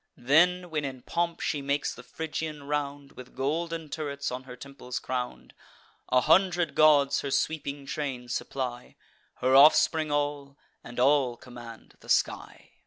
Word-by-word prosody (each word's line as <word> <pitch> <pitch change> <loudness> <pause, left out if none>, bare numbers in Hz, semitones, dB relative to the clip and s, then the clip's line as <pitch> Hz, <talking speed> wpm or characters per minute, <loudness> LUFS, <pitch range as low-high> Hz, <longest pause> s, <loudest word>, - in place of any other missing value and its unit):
Then, 175 +7 +3
when 155 -2 -1
in 130 -2 -6
pomp 170 0 -2
she 145 - -1
makes 140 +1 -1
the - - -11
Phrygian 155 +2 -5
round, 145 -1 -3
With 125 0 -13
golden 165 +4 -2
turrets 145 -2 -4
on 130 +1 -6
her 125 -1 -9
temples 125 -1 -8
crown'd; 125 -1 -5 0.6
A 125 - +4
hundred 180 0 +3
gods 150 -3 +4
her 140 - -4
sweeping 145 -1 -2
train 135 -3 -4
supply; 125 0 -4 0.4
Her 130 +1 +2
offspring 155 +2 +6
all, 145 -1 -2 0.3
and 120 +1 -8
all 130 -2 +3
command 120 -2 -12
the - - -16
sky. - - -1
140 Hz, 145 wpm, -28 LUFS, 130-155 Hz, 0.6 s, offspring